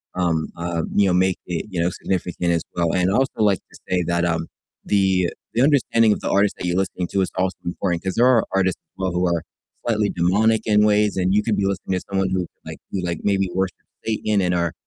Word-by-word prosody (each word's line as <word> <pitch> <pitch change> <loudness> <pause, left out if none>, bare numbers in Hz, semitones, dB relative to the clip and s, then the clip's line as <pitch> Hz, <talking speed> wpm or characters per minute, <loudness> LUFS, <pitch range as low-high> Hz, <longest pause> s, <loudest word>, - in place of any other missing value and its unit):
um, 85 -3 0
uh, 85 -1 -2
you 100 - +5
know, 90 - +2
make 95 +1 +2
it, 90 +4 -3
you 90 -4 -4
know, 85 - +2
significant 90 -1 -2
as 85 - 0
well, 85 -1 +1
and 90 0 +2
I'd - - 0
also 135 +3 +2
like 100 -4 +3
to - - -15
say 90 -1 +1
that, 85 0 +1
um, 80 -1 -1 0.4
the 95 -3 +2 0.2
the 120 - +2
understanding 115 -6 +4
of - - -4
the - - -2
artist 100 +1 +3
that - - -5
you're 90 0 0
listening 95 -2 -1
to 100 - +1
is 95 - -1
also 95 0 0
important, 85 0 -2
'cause 95 - -2
there 120 +2 +5
are 125 -4 +4
artists 95 -1 +1
as - - -62
well 95 -1 0
who 90 +1 0
are 85 -1 0 0.4
slightly 110 -3 +1
demonic 105 +6 +2
in 105 -1 +4
ways, 105 -1 +2
and 95 0 +1
you 105 - +4
could 110 -1 +1
be 100 - +1
listening 95 -1 -1
to - - -15
someone 95 -1 0
who 95 0 0
could 90 - -6 0.2
like - - -7
who, 95 - -2
like, 85 -2 -3
maybe 95 -2 +1
worship 95 -2 -1 0.3
Satan 110 -2 0
and 90 -1 +1
are 85 -1 0
95 Hz, 245 wpm, -22 LUFS, 90-105 Hz, 0.4 s, you